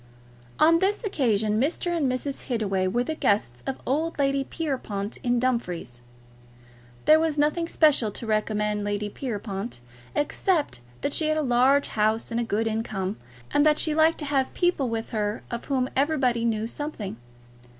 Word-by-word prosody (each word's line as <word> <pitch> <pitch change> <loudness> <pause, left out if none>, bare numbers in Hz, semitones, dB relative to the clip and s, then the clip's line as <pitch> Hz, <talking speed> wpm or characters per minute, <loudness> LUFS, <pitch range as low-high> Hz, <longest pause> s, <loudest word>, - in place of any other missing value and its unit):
On 330 +1 +5
this 400 +5 +1
occasion 220 - +1
Mr. 345 +4 0
and 285 -6 +1
Mrs. 270 +2 -3
Hittaway 195 -6 0
were 240 +6 +1
the 315 - -3
guests 200 - 0
of 270 - -3
old 315 +5 -1
Lady 275 -1 +1
Pierrepoint, 245 -10 -4
in 245 -1 +2
Dumfries. 180 - -2 1.0
There 310 +1 +7
was 320 -2 0
nothing 305 +3 +1
special 300 -10 +4
to 230 - -6
recommend 210 -1 0
Lady 205 0 -2
Pierrepoint 205 - -5 0.4
except 295 - 0 0.2
that 285 - -1
she 315 - +1
had 310 0 +1
a 310 - +1
large 260 +2 +3
house 220 +2 0
and 230 - 0
a - - +1
good 225 0 -1
income, 215 -3 -2 0.3
and 290 - +4
that 305 0 +4
she 310 - +2
liked 320 +1 +4
to 300 - -4
have 275 -2 0
people 350 -8 +1
with 225 0 -4
her 210 -1 -2
of 235 0 -4
whom 260 -2 0
everybody 265 -5 +1
knew 220 -1 0
something. 235 - -5
250 Hz, 165 wpm, -26 LUFS, 215-295 Hz, 1.0 s, There